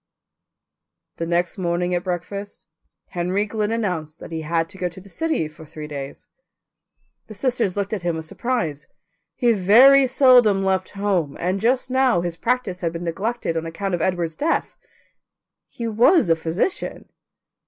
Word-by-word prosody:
The 165 - -3
next 175 +3 0
morning 175 0 -1
at 175 0 0
breakfast 200 +3 -5 0.4
Henry 185 +3 -1
Glynn 215 0 -2
announced 180 -9 -2
that - - -11
he 160 -1 -3
had 165 +1 0
to - - -11
go 180 - -1
to 175 - -12
the 195 +2 -15
city 320 - -1
for 155 +1 -14
three 155 0 -9
days. 140 -2 -8 1.0
The 215 - -10
sisters 235 -4 0
looked 200 +1 -2
at 205 - -2
him 170 -1 -1
with 160 0 -5
surprise. 165 - -3 0.5
He 240 -2 +3
very 245 +7 +6
seldom 245 -7 +5
left 190 -1 0
home, 185 -8 0
and 185 +3 -1
just 250 +2 +1
now 260 -8 +3
his 175 -1 -3
practice 230 -1 -1
had 165 -2 -1
been 165 +1 -5
neglected 195 +2 -2
on 165 0 -2
account 195 +4 -4
of 175 - -1
Edward's 170 -3 -1
death. 320 +3 -1 0.9
He 235 - -6
was 230 - +4
a - - +5
physician. 165 - -2
185 Hz, 165 wpm, -22 LUFS, 165-230 Hz, 1.0 s, very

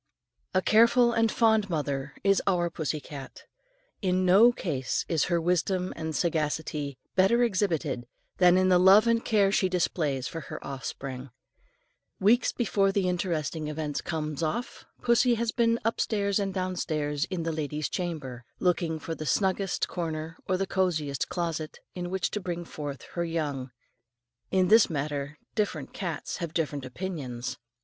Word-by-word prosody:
A 185 - +3
careful 235 +2 +5
and 225 -1 +2
fond 220 -3 +3
mother 145 -3 -2
is 195 0 +4
our 175 -3 +2
pussy 155 -1 -2
cat. 140 -2 -10 0.6
In 185 -2 +1
no 200 +7 +7
case 140 - -2
is 160 -3 +1
her 170 -1 +1
wisdom 180 +2 0
and 160 -1 -4
sagacity 150 -4 -1 0.2
better 195 +6 +4
exhibited 165 - 0 0.3
than 180 0 +6
in 185 0 +3
the 180 -1 +5
love 195 +4 +7
and 230 0 +2
care 205 -3 +3
she 190 -2 +2
displays 155 -7 0
for 165 - -5
her - - -7
offspring. 135 -1 -6 0.9
Weeks 225 +5 +4
before 200 -5 +1
the 195 -1 +1
interesting 165 -4 -1
event 150 -1 -3
comes 155 -2 -3
off, 220 +10 -3 0.2
pussy 240 0 +4
has 230 0 -1
been 230 -1 +2
"upstairs 205 -3 +1
and 195 -1 -1
downstairs 160 -5 -1
and - - -8
in 170 -3 -2
the 165 - -1
lady's 150 -1 -2
chamber," 150 -9 -4
looking 170 -3 +1
for 165 +1 -5
the 155 -1 -6
snuggest 195 0 +1
corner 160 -2 -4
or 185 - +2
the 195 - 0
cosiest 160 -8 -1
closet 165 -3 -3 0.2
in 175 -1 -4
which 190 +1 -1
to 210 - -2
bring 175 -3 -4
forth 145 -4 -6
her 170 - -1
young. 150 -6 -2 0.8
In 185 -1 +3
this 220 0 +7
matter 145 -1 -3 0.2
different 180 - -2
cats 170 -6 -4
have 170 -1 -5
different 145 -5 -1
opinions. 130 -5 -5
175 Hz, 155 wpm, -28 LUFS, 150-195 Hz, 0.9 s, no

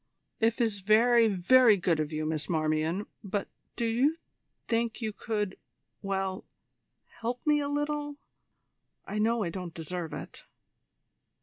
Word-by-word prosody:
"If 225 +2 +2
is 220 -4 +1
very, 230 +3 +5
very 215 +3 +5
good 175 -3 +1
of 155 0 -1
you, 155 0 -2
Miss 155 -1 -2
Marmion; 160 +4 0 0.2
but 200 0 -2 0.3
do 235 - -1
you 250 +7 +2 0.5
think 230 -1 0
you 220 -3 -3
could 210 -3 -3 0.4
well, 195 -1 -2 0.8
help 240 +2 -3
me 300 -1 +4
a 285 -1 -2
little? 290 0 -2 0.9
I 210 +2 -3
know 225 +1 +2
I 170 - -2
don't 180 -2 -6
deserve 165 0 -4
it." - - -8
210 Hz, 135 wpm, -29 LUFS, 180-235 Hz, 0.9 s, very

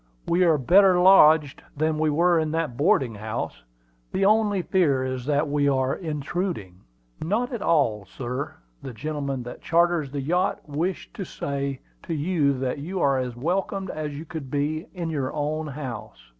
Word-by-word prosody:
"We 175 +2 +3
are 160 -3 +4
better 185 +6 +5
lodged 160 -6 +6 0.2
than 155 +1 0
we 155 0 +2
were 170 +3 +3
in 155 -1 0
that 160 -6 -1
boarding 145 - +2
house. 105 - -5 0.5
The 195 - +1
only 205 -2 +3
fear 145 -10 +2
is 130 0 -4
that 150 +1 +1
we 145 0 +1
are 130 -1 +1
intruding." 150 - -4 0.4
"Not 230 +10 -1
at 235 - -4
all, 125 - +2
sir. 130 - -5 0.3
The 135 -2 -7
gentleman 140 +1 -3
that 120 - -9
charters 170 -3 +2
the 140 +1 -4
yacht 180 +7 -1
wished 165 +6 -3
me - - -1
to - - -11
say 140 -1 -3 0.2
to 165 - -4
you 150 -3 +1
that 130 +2 -2
you 180 +6 -4
are 135 -4 +2
as 125 -2 -3
welcome 190 +7 -2
as 150 -2 -4
you 155 - -7
could 155 -4 -7
be 150 +4 -2
in 170 -2 -3
your 140 -4 -2
own 155 +1 -2
house." 130 - -7
150 Hz, 175 wpm, -25 LUFS, 135-175 Hz, 0.5 s, lodged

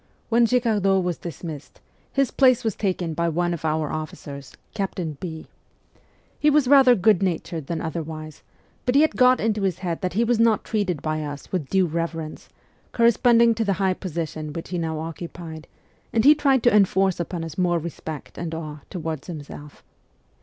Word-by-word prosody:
When 235 0 +4
Girardot 210 -6 +2
was 175 -2 -2
dismissed, 160 -3 -8 0.3
his 275 -3 +1
place 255 -2 +4
was 220 -4 -1
taken 180 -5 -2
by 170 +2 0
one 175 +2 0
of 170 - -6
our 155 -1 0
officers, 145 -3 -7 0.2
Captain 185 -6 -3
B. 160 -3 -6 0.9
He 300 - +4
was 295 -3 +3
rather 265 -2 +7
good 200 -1 +3
natured 165 -4 -2
than 170 -2 -3
otherwise, 155 -2 -6 0.5
but 250 - +2
he 285 - +7
had 315 - +2
got 255 0 +5
into 215 -1 0
his 190 -3 0
head 170 -2 -2
that 180 -2 -2
he 225 +5 +2
was 235 -1 +1
not 230 -2 +3
treated 190 -9 -2
by 155 0 -1
us 145 -1 -7
with 170 -7 -2
due 190 -1 +3
reverence, 165 -1 -4 0.4
corresponding 235 0 +5
to 225 0 -1
the 200 -2 +1
high 190 -1 +2
position 160 -4 -5
which 165 - -6
he 180 -1 -2
now 160 -1 -2
occupied, 165 0 -7 0.4
and 225 +1 +1
he 295 - +9
tried 275 -4 +2
to 240 - +4
enforce 190 -2 +3
upon 170 0 -3
us 165 -2 -7
more 175 -2 +1
respect 160 -2 -7
and 165 -1 -4
awe 155 -2 -6
toward 160 -5 -4
himself. 150 -3 -9
175 Hz, 180 wpm, -24 LUFS, 160-220 Hz, 0.9 s, he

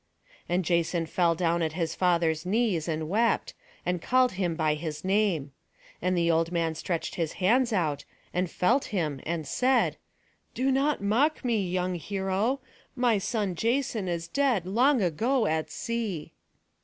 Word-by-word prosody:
And 175 +1 +1
Jason 170 0 +1
fell 170 0 +1
down 170 0 +1
at 160 -2 -1
his 165 -1 -2
father's 170 -3 +1
knees, 195 -4 0
and 160 -1 -2
wept, 225 +5 +1 0.3
and 180 -1 -1
called 255 +3 +3
him 185 -3 -1
by 155 -2 +1
his 150 +1 -5
name. 190 -8 +1 0.5
And 185 0 +1
the 170 0 +3
old 165 +1 +1
man 165 -2 0
stretched 165 +1 -3
his 165 -2 -2
hands 235 +6 +2
out, 155 -8 0 0.3
and 180 0 0
felt 240 +12 +2
him, 160 - -2
and 165 -2 -2
said: 255 - +2 0.6
"Do 265 +2 +1
not 275 -3 +1
mock 260 +9 +1
me, 215 -7 +1
young 180 0 -1
hero. 195 - -1 0.3
My 245 -5 +2
son 205 -1 -1
Jason 230 +1 0
is 170 -1 -2
dead 260 -9 +1
long 240 +5 +3
ago 225 - +1
at 160 -3 0
sea." 220 -9 -4
185 Hz, 155 wpm, -28 LUFS, 165-230 Hz, 0.6 s, called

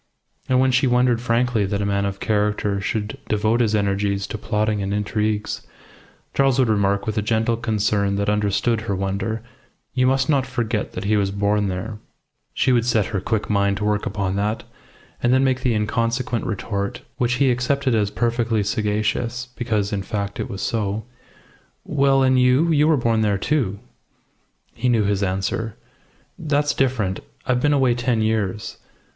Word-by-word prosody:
And 130 0 +4
when 130 0 +3
she 130 +2 +3
wondered 125 -1 +3
frankly 120 -2 +1
that 100 0 -1
a 100 - -1
man 100 0 0
of 100 0 -5
character 105 -1 0
should 105 +2 -3
devote 110 +2 +2
his 110 -2 +2
energies 100 -1 0
to - - -5
plotting 105 -1 0
and 100 +1 -1
intrigues, 105 0 -1 0.7
Charles 135 -2 +3
would 130 -3 +3
remark, 100 -2 +1
with 110 0 -1
a - - 0
gentle 110 +2 +1
concern 105 -3 0
that 100 0 -1
understood 105 +2 +1
her 105 -3 -2
wonder, 100 +4 -2 0.5
"You 130 -1 +2
must 130 0 +2
not 140 -4 +2
forget 115 -3 -2
that 90 - -5
he 105 +2 +2
was 100 -1 +1
born 100 +1 +1
there." 95 +4 -4 0.6
She 130 - +2
would 120 -2 +3
set 110 -4 +2
her 100 - 0
quick 110 +2 -1
mind 100 -1 +1
to 105 - -2
work 105 -1 0
upon 100 -2 -2
that, 105 +2 -1 0.6
and 120 - +2
then 130 +1 +4
make 130 -1 +1
the 125 -3 +1
inconsequent 115 +3 -1
retort, 100 -2 -3
which 120 0 +1
he 130 +1 +3
accepted 130 +1 0
as 105 -3 +2
perfectly 115 -1 0
sagacious, 110 +4 -1
because, 110 -4 -1
in 100 - -1
fact, 100 0 -4
it - - -3
was 100 - -5
so 105 -1 -1 0.8
"Well, 135 -2 +2
and 130 -1 +4
you? 130 +7 +4
You 150 -1 +4
were 160 -2 +4
born 115 -3 +1
there, 105 -2 +2
too." 110 -4 0 1.0
He 125 - -1
knew 115 -3 +3
his 100 0 0
answer. 100 +4 -2 0.6
"That's 145 -1 +1
different. 120 -8 0 0.3
I've 125 -2 +1
been 145 - +3
away 135 -4 +3
ten 120 -2 0
years. 105 -3 -2
110 Hz, 175 wpm, -22 LUFS, 100-125 Hz, 1.0 s, And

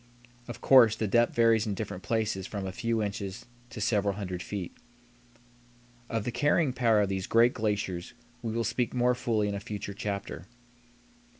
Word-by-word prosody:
Of 120 - -8
course, 120 -5 +6
the 110 - -2
depth 120 +3 +2
varies 115 -1 +4
in 100 - -2
different 95 -3 -5
places 110 -4 -1
from 100 -2 -5
a 95 - -3
few 115 +3 -1
inches 100 -1 -5 0.2
to 120 - -8
several 100 -2 +1
hundred 90 -3 -5
feet. 95 -3 -5 1.3
Of 115 -2 -1
the 120 - -3
carrying 145 +2 +2
power 115 -4 +3
of 100 - 0
these 95 -1 -3
great 115 +2 +4
glaciers 105 -5 -2 0.3
we 115 - -3
will 115 +1 -1
speak 125 +1 -1
more 125 0 +3
fully 115 -4 0
in 100 - -2
a 100 - -3
future 100 0 -6
chapter. 100 -3 -5
110 Hz, 175 wpm, -29 LUFS, 100-115 Hz, 1.3 s, course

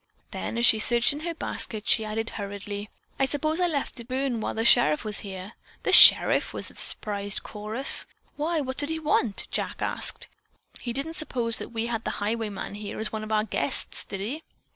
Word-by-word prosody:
Then, - - -5
as 235 - +2
she 220 - +6
searched 240 +4 +4
in 290 - -7
her 335 +1 -5
basket, 215 -8 -4
she 220 - +3
added 220 +1 -4
hurriedly: 205 0 -6 0.3
"I 270 - +2
suppose 310 +4 -1
I 355 - +3
left 285 -5 -3
it 235 - -9
burn 260 -3 -2
while - - -4
the 225 +1 -2
sheriff 235 -11 +4
was 210 -2 +1
here." 190 +1 -8 0.3
"The - - 0
sheriff!" - - +8
was - - -5
the - - -19
surprised 205 -1 -3
chorus. 215 +5 +1 0.3
"Why, 315 +2 -1
what 260 -1 -5
did 290 +1 +1
he 320 - -2
want?" 290 -9 -1
Jack - - -3
asked. - - -3 0.5
"He 240 - -5
didn't 275 +6 -2
suppose 235 -7 0
that - - -7
we 225 0 -3
had 230 -1 -3
the - - -4
highwayman 210 -2 -4
here 205 0 -7
as 220 -1 -2
one 220 -1 -5
of 215 - -7
our 215 -1 +2
guests, 220 - +2
did 195 -1 -7
he?" 260 +11 -4
230 Hz, 205 wpm, -25 LUFS, 210-270 Hz, 0.5 s, sheriff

